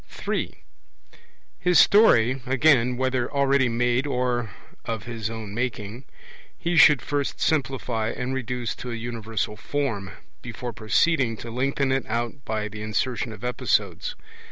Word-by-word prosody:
(3) - - -4 1.0
His 180 -1 +3
story, 130 - +5
again, 125 -2 +3
whether 130 -1 0
already 140 -2 +3
made 120 +3 +1
or 125 -3 -1 0.3
of 115 -3 -4
his 115 -2 -4
own 110 -3 -6
making, 115 0 -4 0.5
he 170 0 -1
should 150 -3 +7
first 145 -1 -2
simplify 125 -7 0
and 125 +2 -3
reduce 125 -2 -3
to 125 - -7
a 120 - -3
universal 115 -2 -3
form, 110 -4 -3 0.3
before 120 0 -6
proceeding 115 +2 +1
to 115 - -8
lengthen 135 +2 0
it 135 -1 0
out 120 +4 -3
by 110 -1 -2
the 105 0 -8
insertion 110 +3 -1
of 105 0 -11
episodes. 120 -7 0
120 Hz, 135 wpm, -25 LUFS, 110-135 Hz, 1.0 s, should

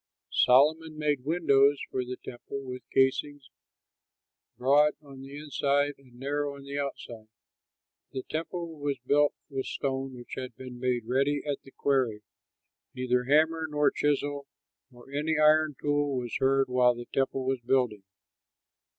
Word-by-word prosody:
Solomon 155 +5 +4
made 145 -4 0
windows 145 -3 +4
for 130 - -1
the 125 0 -6
temple 125 +3 -7
with 125 -1 -6
casings, 135 +1 +1 1.1
broad 145 +4 +4
on 140 -3 -13
the 135 +1 -9
inside 145 -1 0
and 130 -3 -20
narrow 145 +1 -2
on 140 - -11
the 140 +1 -4
outside. 120 -5 -6 0.8
The 130 - -4
temple 165 0 -5
was 145 -1 -1
built 145 +2 +3
with 135 -2 -4
stone 135 -1 -3
which 120 -1 -11
had 130 -3 -6
been 125 0 -9
made 125 -2 0
ready 140 +4 +1
at 145 -2 -2
the - - -15
quarry; 130 -7 0 0.7
neither 125 -1 0
hammer 160 +3 +3
nor 150 0 +2
chisel 145 -1 -1 0.4
nor 125 +1 -16
any 150 +2 0
iron 155 -1 +4
tool 145 -2 0
was 120 -2 -4
heard 135 0 +3
while 125 -1 +3
the 120 0 -7
temple 135 -1 0
was 130 -1 -1
building. 120 -4 +1
140 Hz, 145 wpm, -28 LUFS, 130-145 Hz, 1.1 s, Solomon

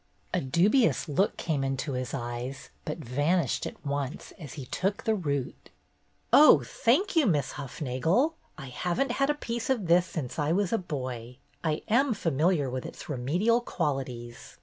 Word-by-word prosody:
A - - +1
dubious 180 - +3
look 175 +7 +1
came 150 -5 -1
into 135 +2 -2
his 125 0 -3
eyes, 125 +1 -5
but 150 - -3
van 150 +5 +1
ished - - -2
at - - -11
once 140 0 -3
as 150 -6 -8
he 140 -5 -6
took 195 +9 -2
the 220 - +2
root. 145 -10 -3 0.6
"Oh, 285 - +8
thank 280 - +1
you. 310 -6 +4
Miss 150 -8 +1
Hufnagel. 150 - 0 0.2
I 135 -3 -8
have 175 +7 -2
n't 275 -2 +2
had 275 +3 +1
a 295 - +2
piece 235 -4 -4
of 240 -7 +1
this 175 +2 +4
since 150 -2 -5
I 150 +2 +1
was 195 +1 +1
a 225 - +2
boy. 125 -7 -5 0.3
I 155 -2 -1
am 240 +2 +3
familiar 165 -2 +1
with 130 0 -3
its - - -9
remedial 175 - +1
qualities. 125 - -4
155 Hz, 170 wpm, -28 LUFS, 130-205 Hz, 0.6 s, Oh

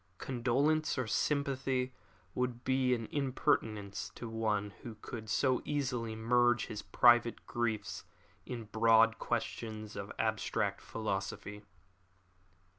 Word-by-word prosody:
Condolence 135 +7 +1
or 130 - 0
sympathy 135 0 0 0.4
would 125 -1 -2
be 130 -1 +2
an 115 -2 -4
impertinence 125 -7 0
to 120 - -6
one 110 -2 -1
who 115 -2 -7
could 110 +1 -8
so 130 +2 +2
easily 125 -6 -2
merge 120 +1 +3
his 105 - -6
private 120 -1 +4
griefs 110 -4 -2 0.4
in 120 -2 -5
broad 115 +1 +4
questions 110 -2 -3
of 100 0 -5
abstract 110 -2 0
philosophy. 105 -1 -4
120 Hz, 110 wpm, -33 LUFS, 110-130 Hz, 0.4 s, private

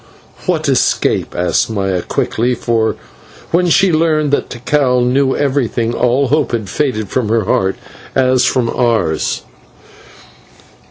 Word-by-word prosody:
"What - - 0
escape?" - - +1
asked 90 +5 0
Maya 95 -4 -1
quickly, 120 +7 -1
for 115 -2 0 0.6
when 175 +1 +2
she 180 +1 +3
learned 155 -2 +1
that 145 - 0
Tikal 125 0 +1
knew 130 +2 +1
everything, 130 -5 0
all 125 +3 +1
hope 145 -3 +1
had 110 -5 -2
faded 120 -8 -1
from 120 -5 -1
her 115 -1 +2
heart, 95 0 0 0.4
as 130 -1 +3
from 125 -2 +1
ours. 115 -11 0
125 Hz, 125 wpm, -15 LUFS, 110-140 Hz, 0.6 s, she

